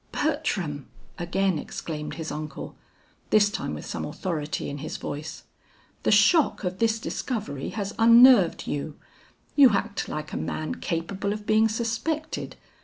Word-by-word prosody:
"Bertram!" 210 - -1 0.3
again 175 0 0
exclaimed 150 -1 -6
his 160 -1 -5
uncle, 155 +1 -6 0.5
this 205 -1 +4
time - - -3
with - - -8
some - - -4
authority 155 -5 -3
in 145 0 -5
his 155 - -5
voice. 150 +2 -6 0.6
"The - - 0
shock 210 - +4
of 185 0 -3
this 225 -1 +2
discovery 215 - -4
has 205 -2 -4
unnerved 230 -4 +7
you. 145 +1 -4 0.6
You 270 -6 +7
act 200 +1 -1
like 155 0 -5
a - - -2
man 85 - -3
capable 190 +4 -2
of 210 0 -7
being 220 +1 +4
suspected. 235 +8 -3
200 Hz, 140 wpm, -26 LUFS, 155-225 Hz, 0.6 s, unnerved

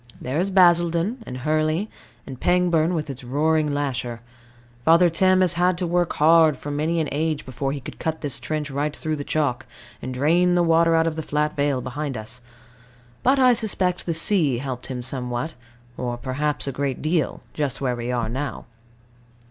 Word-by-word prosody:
There 130 +5 -2
is 190 +3 +1
Basildon 175 +4 +3
and 125 - -6
Hurley 155 - 0 0.4
and 130 -2 -9
Pangbourne, 175 -1 +2
with 155 -2 -2
its 135 -2 -7
roaring 150 +4 +1
lasher. 125 -5 -3 0.6
Father 170 +4 +5
Thames 185 +3 +3
has 180 -2 +4
had 175 +1 +2
to 180 - -1
work 175 0 0
hard 160 -1 +5
for 145 - -6
many 155 +3 0
an 155 - 0
age 155 +1 -1
before 135 +1 -3
he 140 - -4
could - - -10
cut 160 0 -3
this 145 -4 -2
trench 155 -2 -3
right 145 +2 -2
through 155 0 -2
the 145 - -4
chalk, 145 -5 -1 0.3
and 130 - -5
drain 170 +7 +2
the 175 - +3
water 165 0 +4
out 165 0 +3
of 165 -1 -2
the - - -1
flat 150 0 -1
vale 140 -2 0
behind 135 +1 -4
us. 110 +3 -8 0.8
But 265 +3 +3
I 255 -2 +6
suspect 190 -6 0
the 170 - 0
sea 165 - +2
helped 130 -1 -5
him 125 -2 -5
somewhat, 125 +3 -3 0.4
or 120 -1 -3
perhaps 145 +4 -2
a - - -1
great 135 0 -3
deal, 155 -3 0
just 145 -4 -2
where 125 -3 -1
we 120 +1 -4
are 120 -2 -1
now. 135 +6 -4
150 Hz, 190 wpm, -23 LUFS, 130-170 Hz, 0.8 s, I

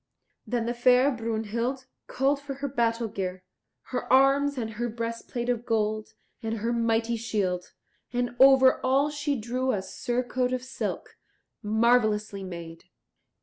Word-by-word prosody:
Then 235 0 -1
the 240 - -1
fair 250 +3 +4
Brunhild 230 +2 -2 0.2
called 275 +2 +1
for 280 -1 -6
her 280 +1 -3
battle 235 -3 0
gear, 185 -3 -4 0.5
her - - -2
arms, 275 +2 +4
and 225 -3 -3
her 240 +2 -3
breastplate 230 +1 -4
of 240 -2 0
gold 215 -2 -1 0.3
and 225 -1 -2
her 230 +3 -1
mighty 230 0 +1
shield; 200 -5 -2 0.4
and 245 0 -2
over 265 -1 +7
all 275 +3 +2
she 290 -2 -2
drew 250 +4 -1
a 195 -5 -2
surcoat 250 +4 -2
of 255 -1 -2
silk, 260 - -5 0.4
marvellously 215 -2 +2
made. 170 -3 -8
235 Hz, 140 wpm, -27 LUFS, 220-260 Hz, 0.5 s, over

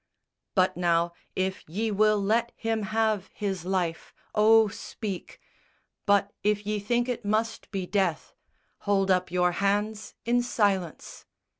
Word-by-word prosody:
But 185 -1 +3
now, 170 -1 +1 0.2
if 190 0 -1
ye 215 +6 -1
will 215 +1 +3
let 225 +4 +1
him 225 -1 -1
have 215 -3 +1
his 195 -4 -3
life, 180 -3 -2 0.2
Oh, 220 +1 +6
speak! 200 -1 -6 0.7
But, 200 0 +3
if 210 0 +1
ye 210 0 -1
think 240 +4 0
it 245 -3 -3
must 220 +2 -1
be 195 -3 -3
death, 195 +1 -1 0.5
Hold 195 -1 +1
up 185 -1 +2
your 180 0 +2
hands 205 +3 -1
in 240 +1 +3
silence!" 200 -8 -1
205 Hz, 135 wpm, -27 LUFS, 190-220 Hz, 0.7 s, Oh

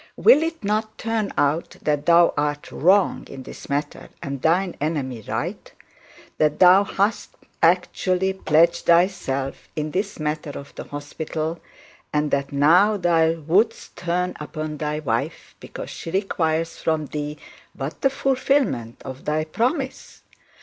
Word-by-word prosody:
Will 435 -9 +6
it 325 -4 -3
not 215 +2 -1
turn 225 -2 -1
out 145 +4 +1
that 150 -1 0
thou 170 0 +6
art 145 0 -2
wrong 190 +4 +2
in 135 -1 -8
this - - -11
matter, 145 +1 -3
and 140 -2 -4
thine 175 +4 +2
enemy 135 -7 -2
right; - - -4 0.7
that 150 -1 +2
thou 185 +2 +7
hast 200 +2 -1 0.3
actually 185 +2 +2
pledged 170 -2 +2
thyself 170 -6 +1
in 155 0 -2
this 195 +2 -2
matter 150 -1 -3
of 140 - -10
the - - -8
hospital, 155 +3 -4 0.5
and 150 0 0
that 140 0 0
now 175 +9 +4
thou 165 -3 +3
wouldst 200 +9 +1
turn 180 +1 -1
upon 155 0 -5
thy 150 0 -2
wife 155 -2 -3
because - - -8
she - - -7
requires 165 -3 -1
from 160 -1 0
thee 150 +1 -5 0.4
but 140 +2 -6
the 270 - +4
fulfilment 265 - 0
of 130 0 -8
thy 155 +1 0
promise? 255 - -3
160 Hz, 140 wpm, -23 LUFS, 150-190 Hz, 0.7 s, thou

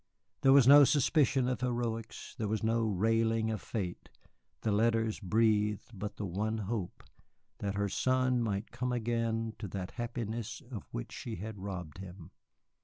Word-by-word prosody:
There 135 - +6
was 135 -3 +7
no 145 +1 +10
suspicion 140 -2 +3
of 125 -1 -1
heroics, 120 -3 -3
there 110 - -1
was 110 +1 -1
no 115 +1 +2
railing 110 +2 +1
at 110 - -2
fate; 95 -6 -5 0.5
the 110 - 0
letters 110 +1 +2
breathed 105 +1 +1
but 105 0 -5
the 105 - -4
one 105 +5 -2
hope, 105 -3 -4 0.6
that 100 -1 -2
her 100 0 0
son 130 +4 +1
might 105 -2 -2
come 125 +1 -2
again 115 -1 -1
to 105 - -4
that 95 0 -5
happiness 115 -2 -4
of 110 -6 -7
which - - -5
she 115 - -6
had 105 +3 -7
robbed 90 -4 -6
him. 90 -2 -10
110 Hz, 160 wpm, -32 LUFS, 100-120 Hz, 0.6 s, no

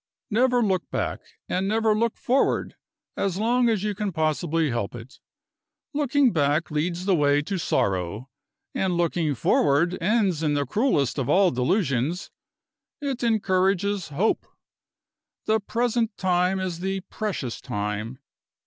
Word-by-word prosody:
Never 245 +2 +3
look 190 -4 0
back, - - -2 0.3
and 185 +2 -1
never 220 +1 +2
look 230 +1 0
forward, 260 +3 +1 0.4
as 195 -2 -1
long 240 +3 +2
as 215 -4 0
you 210 -1 0
can 205 0 -3
possibly 160 -1 0
help 115 -2 -3
it. 120 +4 -11 0.7
Looking 285 -3 +2
back 150 +1 +1
leads 170 +4 -1
the 195 - +3
way 145 -3 +3
to 190 +4 -3
sorrow. 100 - -1 0.5
And 190 -9 0
looking 165 -3 0
forward 150 +8 +2
ends 195 -4 +1
in 150 -2 +1
the 145 -1 0
cruelest 150 - +1
of 135 0 -2
all 185 +3 +4
delusions: 140 - 0 0.7
it 275 -4 -3
encourages 195 -3 +1
hope. 155 +9 0 1.0
The 220 0 +2
present 230 0 -1
time 185 0 +1
is 180 -3 -3
the 190 +1 -2
precious 190 - -4
time. 105 0 -4
185 Hz, 135 wpm, -25 LUFS, 145-215 Hz, 1.0 s, all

